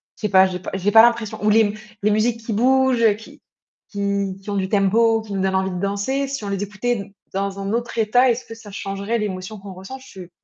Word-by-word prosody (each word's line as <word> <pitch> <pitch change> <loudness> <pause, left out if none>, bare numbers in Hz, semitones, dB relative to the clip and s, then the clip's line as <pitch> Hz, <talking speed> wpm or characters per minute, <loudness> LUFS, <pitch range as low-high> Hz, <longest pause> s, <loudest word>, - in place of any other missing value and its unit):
Je - - -20
sais 210 - 0
pas, 190 0 +6
j'ai 180 -1 -5
pas 180 - -6
j'ai 195 +2 0
pas 225 - +9
l'impression, 230 -3 +1
ou 210 - +3
les 220 - +5
m 205 -2 +1 0.3
les 210 - +3
musiques 225 +2 +1
qui 225 - -2
bougent, 250 -2 +3
qui 225 - -15 0.5
qui 200 -1 -2
qui 200 - -10
ont 200 - -2
du 190 -1 -1
tempo, 225 +3 +3
qui 215 -2 -8
nous 195 - -1
donnent 190 0 0
envie 190 0 0
de 180 - -4
danser, 205 +8 -1
si 270 -6 -4
on - - -4
les 200 0 -2
écoutait 210 +4 -3
n 200 -1 -8 0.2
dans 195 0 -2
un 195 +1 -3
autre 235 0 -3
état, 245 +4 +4
est-ce 240 +2 -3
que 225 - -9
ça 225 -2 -12
changerait 200 +3 -3
l'émotion 200 0 -4
qu'on 195 -1 -9
ressent? 190 +8 -9
Je 195 -7 -12
s 175 - -11
205 Hz, 260 wpm, -21 LUFS, 195-225 Hz, 0.5 s, pas